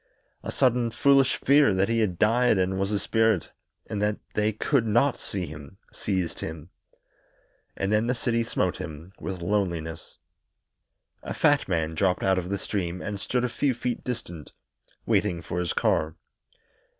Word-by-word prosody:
A - - -5
sudden 125 -3 +2
foolish 135 +2 +4
fear 140 -7 +4
that 95 +1 +2
he 115 0 +1
had 95 -6 0
died 115 +2 +3
and 95 +1 0
was 95 +1 0
a 105 - +1
spirit, 110 -4 +1 0.3
and 105 -2 -4
that 105 0 +1 0.2
they 105 +1 +1
could 115 +3 +1
not 120 +6 +3
see 95 -3 -5
him, 75 +3 -10 0.2
seized 95 -4 -2
him. 80 +1 -7 1.1
And 95 +1 -1
then 105 +2 +2
the 125 - +1
city 115 -1 0
smote - - -1
him 80 +5 -8
with 95 -3 -5
loneliness. 85 -5 -2 1.0
A - - -5
fat 145 -2 +3
man 80 -3 0
dropped 90 +2 +1
out 95 -1 +3
of 90 0 -6
the 100 - -1
stream 90 -4 -3
and 100 +1 -4
stood 125 +5 -1
a - - +2
few 130 +2 0
feet 120 0 -3
distant, 90 - -6 0.5
waiting 85 - +1
for 85 - -3
his 90 -1 -1
car. 80 +1 +1
100 Hz, 165 wpm, -26 LUFS, 90-115 Hz, 1.1 s, foolish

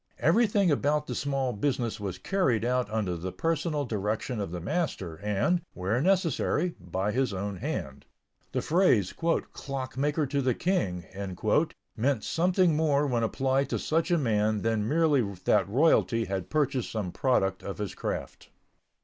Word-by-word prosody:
Everything 205 -6 +3
about 150 +1 +1
the - - -4
small 135 -3 -1
business 120 0 -1
was 95 -3 -4
carried 125 - +1
out 125 -2 +1
under 105 -5 -1
the 90 +2 -4
personal 160 - -1
direction 110 +2 -2
of 100 - -3
the 90 +1 -5
master 95 - -2
and, 105 - +1
where 100 +7 0
necessary, 175 -1 +1
by 95 +3 -2
his 130 -2 0
own 100 +1 -3
hand. 70 -5 -5 0.4
The - - -1
phrase 155 - +3
"clockmaker 145 -2 -1
to 140 +1 -1
the 130 -2 +1
King" 95 - -1 0.9
meant 125 -1 0
something 180 -1 +2
more 150 -2 +2
when 125 -4 0
applied 135 +4 +1
to - - 0
such 165 +2 0
a 175 - +3
man 110 -6 +1
than 110 -2 0
merely 155 -1 +3 0.2
that - - +3
royalty 120 -2 +3
had 95 -2 -4
purchased 140 -5 0
some 105 -5 -3
product 95 -7 +1
of 100 - -6
his 105 -3 -4
craft. - - -5
130 Hz, 150 wpm, -28 LUFS, 105-155 Hz, 0.9 s, Everything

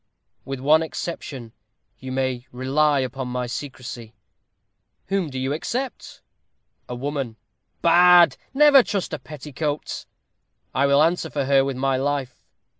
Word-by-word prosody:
"With 135 -1 -5
one 150 +4 +4
exception, 145 -7 -6 0.5
you 130 0 -7
may 130 -1 -2
rely 140 +3 +1
upon 130 0 -4
my 125 0 -3
secrecy." 120 -2 -7 0.9
"Whom 195 -5 0
do 130 - -7
you 130 +1 -1
except?" 245 - -4 0.7
"A 125 - -4
woman." 135 -2 -4 0.5
"Bad! 175 +1 +7 0.2
never 280 0 +7
trust 200 -7 -3
a 155 - -3
petticoat." 150 +1 -5 0.7
"I 140 +1 +2
will 140 +2 +5
answer 165 0 +1
for 140 -3 -2
her 135 0 +4
with 135 -1 -3
my 135 0 +1
life." 135 -2 -3
140 Hz, 130 wpm, -23 LUFS, 130-160 Hz, 0.9 s, Bad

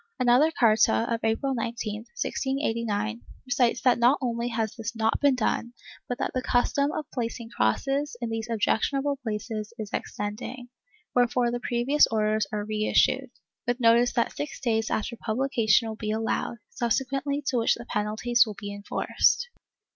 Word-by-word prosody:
Another 250 +5 +5
carta 215 - +4
of 230 - -1
April 225 +5 0
19, 225 -2 -4
1689, 230 - -1 0.2
recites 245 -1 +1
that 250 -2 +3
not 245 +4 +5
only 235 -2 -2
has 225 -3 -2
this 230 0 -5
not 225 0 0
been 285 -2 +4
done, 240 0 -1 0.4
but 245 - -2
that - - -2
the 255 - -1
custom 280 +3 +1
of 305 - -4
placing 235 -2 -4
crosses 275 - 0
in 235 -2 -3
these 225 +1 -3
objectionable 275 +5 +1
places 215 -1 -4
is 215 -3 -6
extending, 235 +4 -5 0.4
wherefore 245 0 +2
the 240 - -2
previous 245 +5 +3
orders 215 -1 +1
are 210 -1 -2
reissued, 215 +4 +2 0.4
with 245 +1 0
notice 235 +1 +5
that 235 - 0
six 295 - -5
days 225 -3 0
after 225 +2 -2
publi 250 +6 -2
cation 225 -2 +3
will 220 - -4
be 215 -1 -5
allowed, 225 +2 -1
subsequently 270 +4 -1
to 255 - 0
which 230 - +3
the 235 - -9
penalties 220 +3 +2
will 210 - -6
be 205 0 -6
enforced. 205 - +1
235 Hz, 160 wpm, -26 LUFS, 220-255 Hz, 0.4 s, Another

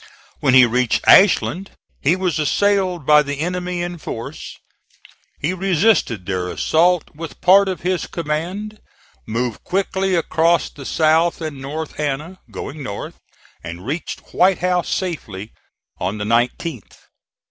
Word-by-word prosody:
When 130 - +3
he 130 -1 +9
reached 120 0 0
Ashland 195 -1 +5 0.3
he 155 +6 +3
was 185 -3 -1
assailed 185 +1 +1
by 150 +1 +6
the 145 -1 -4
enemy 180 +1 -2
in 175 -1 -5
force. 115 -6 -7 0.8
He 160 +5 -1
resisted 185 - +1
their 90 -2 -2
assault 175 - +2
with 165 +1 -8
part 195 +2 +5
of 185 - -4
his 180 0 -1
command, 180 +7 -4 0.5
moved 115 +1 -3
quickly 190 0 0
across 165 0 +2
the 140 -2 -9
South 160 +2 +2
and 155 -4 -6
North 150 +3 -6
Anna, 150 +5 -3
going 145 +2 -7
north, 100 -7 -6 0.4
and 85 +3 -8
reached 155 +7 -4
White 185 0 +4
House 180 -1 0
safely 110 - -4 0.5
on 95 +4 -2
the 105 - -4
19th. 120 - -1
160 Hz, 135 wpm, -20 LUFS, 130-180 Hz, 0.8 s, he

